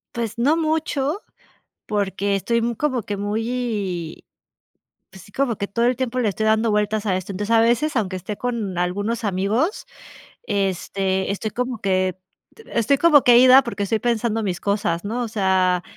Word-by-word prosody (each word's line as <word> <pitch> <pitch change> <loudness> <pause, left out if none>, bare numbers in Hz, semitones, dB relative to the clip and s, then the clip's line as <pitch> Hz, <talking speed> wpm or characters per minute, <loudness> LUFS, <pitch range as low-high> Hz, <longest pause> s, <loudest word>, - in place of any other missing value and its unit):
Pues, 235 -1 -3
no 285 +6 +3
mucho 315 +1 -1 0.6
porque 200 -1 -1
estoy 235 +4 0
como 260 -4 -1
que 205 -2 -4
muy, 205 -5 -3 0.9
pues, 190 -1 -13
sí, 205 - -17
como 255 -5 0
que 200 - -3
todo 230 +4 -1
el 250 -1 +2
tiempo 255 -1 -2
le 220 - +1
estoy 220 +3 -2
dando 220 +1 +2
vueltas 210 +1 0
a 185 - +1
esto. 185 +2 -5
Entonces, 205 +4 0
a - - +5
veces, 240 +6 +1
aunque 195 -4 0
esté 190 +3 -5
con 225 -7 -3
algunos 205 +6 -2
amigos, 205 - 0 0.6
este, 195 - -1
estoy 210 +1 -3
como 250 -1 -3
que 185 -2 0 0.5
estoy 235 +5 +1
como 305 -5 +6
que 240 -1 +7
ida 255 +2 +8
porque 205 -3 -3
estoy 220 +3 0
pensando 225 -1 0
mis 180 -4 -3
cosas, 200 -4 -1
¿no? 240 +4 -2
O 235 - -3
sea, 190 -4 +1
215 Hz, 170 wpm, -22 LUFS, 195-240 Hz, 0.9 s, ida